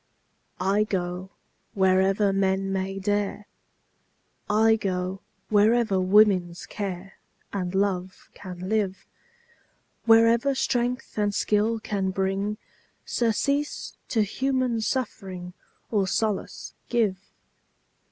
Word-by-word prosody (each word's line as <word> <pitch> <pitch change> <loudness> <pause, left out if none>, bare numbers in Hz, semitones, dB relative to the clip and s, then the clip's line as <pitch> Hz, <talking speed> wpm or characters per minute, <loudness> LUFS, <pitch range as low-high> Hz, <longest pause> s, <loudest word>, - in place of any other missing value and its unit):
I 195 +3 +2
go 180 -2 -3 0.5
wherever 190 +1 +3
men 195 0 +1
may 195 0 -2
dare, 205 +1 -1 1.0
I 220 +1 +4
go 190 -2 -3 0.3
wherever 215 -1 +3
woman's 185 -3 +3
care 195 -2 -6 0.3
And 185 -2 -3
love 190 -2 -2
can 185 -1 -8
live, 200 -2 -1 1.0
Wherever 230 +4 +5
strength 245 -2 -1
and 205 -1 +1
skill 215 +2 +1
can 200 -3 -2
bring 195 +2 -1 0.5
Surcease 280 +5 -1
to 220 -3 +2
human 255 +1 0
suffering, 190 -7 -3 0.4
Or 200 -4 +2
solace 210 +1 -2 0.2
give. 215 -6 +1
200 Hz, 95 wpm, -26 LUFS, 190-220 Hz, 1.0 s, Wherever